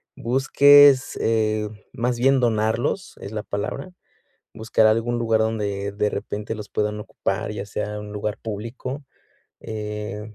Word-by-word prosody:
busques, 135 +2 +5
eh, 110 -1 +1 0.2
más 120 0 -1
bien 135 +2 +4
donarlos, 115 - 0
es 100 - -7
la 110 -1 -3
palabra, 105 - -4 0.7
buscar 110 0 +2
algún 115 +2 +2
lugar 115 -1 +2
donde, 105 -3 -1
de 105 +1 0
repente, 105 +2 -4
los 105 -2 -8
puedan 105 0 -2
ocupar, 105 - -3
ya 105 -1 -5
sea 105 +1 -4
un 105 0 -8
lugar 105 +1 -3
público, 115 +6 -6 0.6
eh, 105 0 -6
110 Hz, 135 wpm, -23 LUFS, 105-120 Hz, 0.7 s, busques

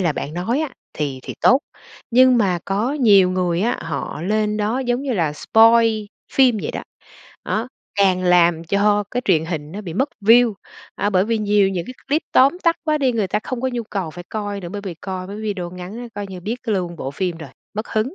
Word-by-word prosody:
là 170 -5 +1
bạn 150 +3 -5
nói 230 - -1
á 310 - -1 0.2
thì 140 -4 -3
thì - - -7
tốt. 260 - +6 0.5
Nhưng 255 +1 +6
mà 190 -5 +2
có 210 +8 -1
nhiều 205 -10 +5
người 180 -1 0
á, 235 +4 +1
họ 165 -1 -5
lên 210 +2 0
đó, 215 +4 0
giống 245 0 -1
như 275 -3 -2
là, 165 -7 0
spoil 225 +5 +4 0.3
phim 255 -4 +4
vậy - - -2
đó. - - -5 0.6
Đó, 225 +4 -2 0.3
càng 185 -2 +3
làm 175 -2 +4
cho 205 +3 +2
cái 250 +1 -2
truyền 160 -5 +3
hình 160 -2 -5
nó 205 - -5
bị 175 -5 -7
mất 265 +9 +1
view 230 +3 +5 0.4
à, 205 +1 0
bởi 185 0 +3
vì 225 0 0
nhiều 205 -2 +3
những 180 -3 -3
cái 255 - -8
clip 300 +3 +1
tóm 275 +7 +5
tắt 335 -1 +3
quá 305 -1 +1
đi, 260 -3 +2
người 210 -5 -1
ta 210 - 0
không 255 -2 -4
có 260 - 0
nhu 240 - -2
cầu 185 -6 -3
phải 175 +3 -10
coi 205 -2 -4
nữa. 175 - -7
Bởi 205 +2 -5
vì 185 - -5
coi 185 +2 -6
mấy 200 +2 -7
cái 215 - -7
video 195 -5 -3
ngắn 180 +4 -8
đó 245 - -6
coi 205 0 -4
như 185 -1 -8
biết 225 +7 -4
luôn 185 -7 -2
bộ 135 - -4
phim 175 +2 -2
rồi, 155 -5 -9 0.2
mất 215 +2 -4
hứng, 220 +9 -1
205 Hz, 235 wpm, -20 LUFS, 180-235 Hz, 0.6 s, tốt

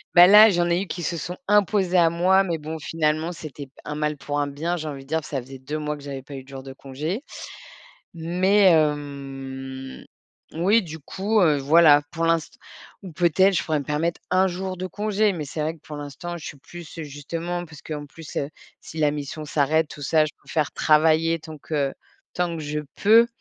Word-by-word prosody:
Bah 175 0 +10
là 210 +2 +9
j'en 175 -1 +1
ai 170 +2 +2
eu - - -9
qui 175 - -5
se 170 0 -2
sont 175 +2 -5
imposés 200 -3 +3
à 165 -2 +5
moi, 185 +3 +4
mais 170 -4 -2
bon 155 +2 -5
finalement, 155 +1 -1
c'était 155 -4 -8
p 135 - -25
un 150 - -5
mal 150 0 -1
pour 145 +1 -3
un 145 - +1
bien, 155 +5 -2
j'ai 155 -2 -5
envie 140 -2 -6
de - - -22
dire, 160 +1 -1
ça 135 -3 -3
faisait 135 +2 -11
2 145 +4 -5
mois 150 0 -3
que 145 - -13
j'avais 140 -1 -6
pas 140 +2 -10
eu 135 - -7
de - - -26
jours 135 -1 -8
de 135 0 -9
congé. 145 - -5 0.9
Mais 185 +4 +3
hem 135 -3 -3 0.5
oui, 195 +8 +3
du 160 -3 -8
coup, 205 +8 0
heu, 155 -4 +4
voilà, 150 +1 +6
pour 165 +1 -2
l'inst 165 -2 +1 0.5
ou 185 -3 -9
peut-être, 180 +4 +3
je 155 - +1
pourrais 155 -2 0
me - - -7
permettre 155 +4 -1
1 185 +1 +4
jour 185 +1 -4
de 185 - -3
congé, 210 +2 0
mais 155 -3 -4
c'est 150 +2 -6
vrai 155 +2 -1
que 165 - -20
pour 150 - -9
l'instant, 145 +4 -6
je 160 - -9
suis 150 - -8
plus 170 +5 -11 0.2
justement, 165 +4 -5
parce 160 -3 -13
qu'en 150 -2 -6
plus, 155 +1 -11
heu, 140 - -1 0.3
si - - -12
la 150 -1 +3
mission 145 +1 -5
s'arrête, 150 +2 +1
tout 150 - -11
ça, 155 +2 +3
je 155 - -4
préfère 155 -3 -2
travailler 160 +1 +3
tant 155 -1 -10
que 140 -2 -2 0.4
tant 175 -1 -1
que 160 - -5
je 150 0 -3 0.2
peux 225 +3 +7
155 Hz, 220 wpm, -24 LUFS, 145-175 Hz, 0.9 s, Bah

